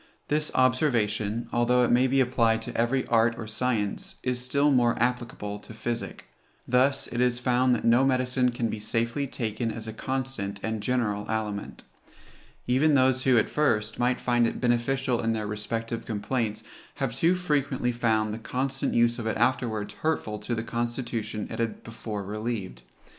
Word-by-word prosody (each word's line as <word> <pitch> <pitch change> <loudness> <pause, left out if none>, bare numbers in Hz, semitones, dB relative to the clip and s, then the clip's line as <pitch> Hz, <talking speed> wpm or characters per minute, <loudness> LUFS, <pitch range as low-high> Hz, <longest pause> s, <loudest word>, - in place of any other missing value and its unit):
This 150 +1 +1
observation, 115 -4 +1
although 125 +1 +3
it 120 - +2
may 125 +2 +4
be 135 +1 +3
applied 115 -3 +2
to - - -7
every 120 +3 +1
art 115 0 +3
or 115 - -5
science, 110 -2 -2
is 125 -1 -1
still 140 +3 +2
more 120 -3 +3
applicable 120 -4 -2
to 110 - -12
physic. 115 +1 -4 0.4
Thus 130 +3 +3
is 125 0 0
it - - -6
found 125 0 +3
that - - -4
no 120 +3 +5
medicine 125 -1 +2
can 120 -1 -1
be 110 - -4
safely 115 +6 -1
taken 115 -2 -2
as 110 0 -7
a 110 - -5
constant 130 -6 -3
and 110 -1 -2
general 105 -3 -1
aliment. 105 -2 -3 0.8
Even 140 +4 +3
those 130 -1 +3
who, 130 -2 +5
at 110 - +3
first, 110 -7 0
might 125 0 +2
find 120 -1 +2
it - - -4
beneficial 125 +1 +1
in 115 0 +1
their 110 -1 -2
respective 115 +2 -3
complaints, 110 0 -2 0.3
have 130 -4 -2
too 170 +7 +3
frequently 145 -8 0
found 110 -3 +1
the 110 - -5
constant 130 +4 -2
use 120 +1 +3
of 115 - -3
it 110 - -1
afterwards 115 -3 0
hurtful 130 -9 -1
to 105 +3 -3
the 115 - -3
constitution 115 -2 -3
it - - -5
had 115 -1 -2
before 110 -2 -5
relieved. 105 - -4
120 Hz, 170 wpm, -27 LUFS, 110-130 Hz, 0.8 s, no